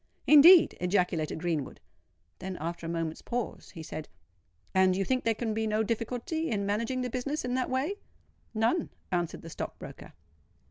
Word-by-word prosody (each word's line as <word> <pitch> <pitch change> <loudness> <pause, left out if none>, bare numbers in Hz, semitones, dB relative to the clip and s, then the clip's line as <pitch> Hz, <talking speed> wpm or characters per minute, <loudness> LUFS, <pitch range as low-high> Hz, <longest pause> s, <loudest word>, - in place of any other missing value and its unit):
"Indeed!" 320 +4 +8
ejaculated 180 -4 0
Greenwood: 165 -5 -2 0.6
then, 185 0 -5
after 165 +1 -4
a - - -3
moment's 165 -1 -3
pause, 245 -1 -4
he 165 - -7
said, 155 -1 -7 0.6
"And 190 -1 +4
you 195 - 0
think 255 +3 0
there 225 -1 +1
can 220 0 -2
be 220 0 -1
no 215 +1 +1
difficulty 245 +9 -2
in 200 -3 -1
managing 230 +5 -1
the 250 - -2
business 270 +4 -2
in 250 - -2
that 255 0 0
way?" 275 +10 -1 0.6
"None," 230 +10 +1 0.2
answered 175 -2 -2
the 165 - -8
stock - - -6
broker. - - -11
220 Hz, 170 wpm, -29 LUFS, 175-255 Hz, 0.6 s, Indeed